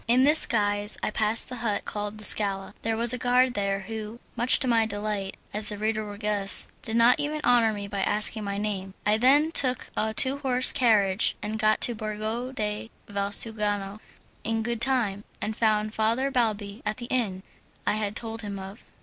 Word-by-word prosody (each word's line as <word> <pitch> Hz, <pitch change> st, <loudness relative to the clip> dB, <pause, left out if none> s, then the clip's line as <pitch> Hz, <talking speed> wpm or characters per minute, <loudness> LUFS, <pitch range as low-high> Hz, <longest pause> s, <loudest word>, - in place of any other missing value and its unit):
In 245 Hz, +3 st, +4 dB
this 300 Hz, +3 st, +7 dB
guise 205 Hz, -1 st, 0 dB
I -, -, -1 dB
passed 215 Hz, +1 st, +2 dB
the 250 Hz, -, -8 dB
hut 220 Hz, -3 st, -3 dB
called 210 Hz, 0 st, -5 dB
the 215 Hz, -, -8 dB
Scala. 195 Hz, -1 st, 0 dB
There 225 Hz, 0 st, -2 dB
was 235 Hz, +1 st, +2 dB
a 250 Hz, -, -4 dB
guard 250 Hz, +1 st, +2 dB
there 200 Hz, -1 st, -2 dB
who, 220 Hz, +2 st, -8 dB, 0.2 s
much 240 Hz, +1 st, +5 dB
to 260 Hz, -, +3 dB
my 230 Hz, -2 st, +2 dB
delight, 205 Hz, -2 st, -4 dB, 0.2 s
as 210 Hz, 0 st, -1 dB
the 210 Hz, -, -3 dB
reader 215 Hz, +1 st, -2 dB
will 205 Hz, -1 st, -9 dB
guess, 205 Hz, -2 st, +1 dB
did 230 Hz, -6 st, -5 dB
not 235 Hz, +2 st, +4 dB
even 300 Hz, +1 st, -3 dB
honour 240 Hz, -2 st, +3 dB
me 205 Hz, -1 st, -6 dB
by 200 Hz, -1 st, -4 dB
asking 210 Hz, +2 st, +1 dB
my 200 Hz, -1 st, -4 dB
name. 195 Hz, -2 st, -4 dB
I 210 Hz, +1 st, +3 dB
then 285 Hz, +7 st, +4 dB
took 255 Hz, -5 st, +3 dB
a 220 Hz, -, -1 dB
two 260 Hz, +5 st, +4 dB
horse 255 Hz, -2 st, +2 dB
carriage 210 Hz, -4 st, +2 dB
and 215 Hz, +1 st, -4 dB
got 215 Hz, 0 st, +2 dB
to 240 Hz, -, +5 dB
Borgo 220 Hz, +3 st, -5 dB
de 210 Hz, -3 st, -4 dB, 0.2 s
Valsugano 205 Hz, 0 st, -1 dB, 0.4 s
in 225 Hz, 0 st, -2 dB
good 235 Hz, 0 st, -4 dB
time, 235 Hz, -6 st, +2 dB, 0.2 s
and 215 Hz, +1 st, -4 dB
found 215 Hz, -1 st, 0 dB
Father 230 Hz, +5 st, 0 dB
Balbi 215 Hz, -4 st, -2 dB
at 215 Hz, -, -3 dB
the 240 Hz, -, -7 dB
inn 200 Hz, -7 st, -2 dB, 0.4 s
I -, -, +1 dB
had 210 Hz, -1 st, -3 dB
told 225 Hz, -1 st, -3 dB
him 205 Hz, -2 st, -6 dB
of. 195 Hz, +3 st, -10 dB
215 Hz, 195 wpm, -25 LUFS, 205-235 Hz, 0.4 s, this